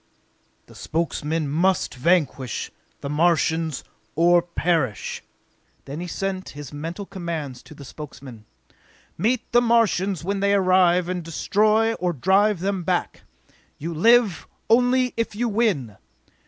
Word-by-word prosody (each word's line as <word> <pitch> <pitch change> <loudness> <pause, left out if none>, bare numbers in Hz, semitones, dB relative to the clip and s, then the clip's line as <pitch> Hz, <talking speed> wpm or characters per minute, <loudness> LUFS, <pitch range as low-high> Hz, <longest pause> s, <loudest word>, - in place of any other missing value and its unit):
The - - -17
Spokesmen 160 -1 -2
must 175 +6 +1
vanquish 140 -4 0 0.3
the 140 - -5
Martians 160 -1 +1 0.3
or 175 +2 +5
perish!" 170 - -1 0.6
Then 140 +3 -6
he 180 - -5
sent 190 +1 -4
his 145 -1 -8
mental 165 +7 -6
commands 165 -9 -5
to 155 - -14
the 140 - -11
Spokesmen: 130 -6 -10 0.7
"Meet 240 +3 -1
the 240 - +5
Martians 205 -6 +2
when 195 +2 -2
they 200 +1 +2
arrive 185 -2 +3
and 180 0 -2
destroy 215 +7 +2
or 180 -4 -2
drive 190 - +2
them 195 0 -1
back! 175 +1 -2 0.6
You 165 +3 -5
live 225 +2 +3 0.2
only 250 +1 +3
if 230 -2 -2
you 240 +3 0
win! 200 - 0
175 Hz, 125 wpm, -23 LUFS, 155-200 Hz, 0.7 s, or